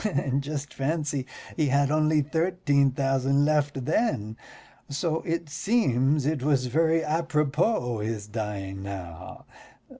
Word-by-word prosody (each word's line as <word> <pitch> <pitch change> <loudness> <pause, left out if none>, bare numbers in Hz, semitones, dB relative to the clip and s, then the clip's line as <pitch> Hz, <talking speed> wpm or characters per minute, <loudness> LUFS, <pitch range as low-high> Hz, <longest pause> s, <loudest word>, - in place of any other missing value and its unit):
And 140 -9 0
just 145 0 -5
fancy, 145 -2 -2 0.3
he 155 -3 +1
had 140 +1 +2
only 155 -1 +3
thirteen 160 -3 +2
thousand 135 +1 +1
left 145 -3 0
then, 130 - 0 0.5
so 160 +3 -1
it 165 0 -1
seems 145 - +1
it 150 -2 0
was 135 -2 +2
very 160 +5 +2
apropos 150 - 0
his 105 -1 -3
dying 105 -3 -5
now. 95 -4 -8
140 Hz, 120 wpm, -26 LUFS, 130-155 Hz, 0.5 s, only